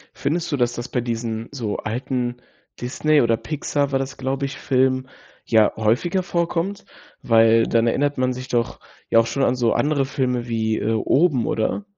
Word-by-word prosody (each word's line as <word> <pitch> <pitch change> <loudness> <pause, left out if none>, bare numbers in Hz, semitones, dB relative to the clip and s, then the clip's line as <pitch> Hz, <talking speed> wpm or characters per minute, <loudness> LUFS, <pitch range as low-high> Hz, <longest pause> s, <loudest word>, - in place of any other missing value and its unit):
Findest 160 +4 -2
du, 145 - 0
dass 120 -1 +1
das 120 +1 -6
bei 125 - -1
diesen, 115 -1 -3
so, 115 -7 -3
alten 120 +2 -3 0.4
Disney 145 +4 +2
oder 115 -1 +2
Pixar, 145 -1 -2
war 135 - +1
das 135 0 -5
glaube 135 +1 -2
ich, 135 - -6
Filmen, 130 0 +1 0.4
ja, 110 -2 +4
häufiger 125 - +1
vorkommt, 170 +3 -2 0.4
weil 115 0 +5
dann 115 0 +2
erinnert 145 +4 +1
man 130 0 +1
sich 130 +1 -7
doch 120 -2 -1 0.3
ja 115 - +5
auch 115 - +3
schon 135 +4 -1
an 125 - +2
so 120 -2 +1
andere 145 -2 +1
Filme 125 -3 -1
wie, 110 -1 0
äh, 110 - -1
Oben 135 +3 +2
oder? 115 - -1
125 Hz, 180 wpm, -22 LUFS, 115-140 Hz, 0.4 s, weil